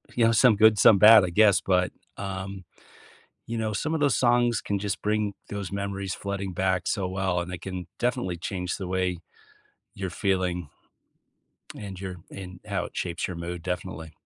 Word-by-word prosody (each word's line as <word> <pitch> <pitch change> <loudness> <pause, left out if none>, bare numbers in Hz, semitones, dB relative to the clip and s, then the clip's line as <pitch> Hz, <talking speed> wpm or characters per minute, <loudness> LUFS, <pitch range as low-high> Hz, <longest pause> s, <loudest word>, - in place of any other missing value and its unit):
You 120 - +4
know, 115 - +4
some 115 0 +5
good, 110 +1 +5
some 105 - +7
bad, 110 -1 +9
I 90 - -3
guess. 105 +1 +5
But, 90 -1 +1 0.3
um, 95 -1 -5 0.8
you 115 0 -3
know, 110 -1 -1
some 150 +10 -2
of 160 - -1
those 145 -2 +3
songs 120 -1 +3
can 100 -1 -2
just 100 0 -3
bring 105 -1 0
those 100 -2 -5
memories 100 -1 -3
flooding 100 -1 -4
back 95 +1 0
so 95 -3 0
well, 95 -1 -1
and 85 - -5
they 90 - -5
can 90 -2 -6
definitely 95 -7 -1
change 90 0 -3
the 95 - -5
way 90 -1 -1 0.8
you're 95 -3 -4
feeling 90 -4 -1 1.1
and 100 -3 -8
your 95 -2 -5
and 90 -2 -9
how 100 -4 -2
it - - -9
shapes 85 -1 -2
your 90 - -5
mood, 85 0 -5
definitely. 90 -3 -5
95 Hz, 180 wpm, -26 LUFS, 90-105 Hz, 1.1 s, bad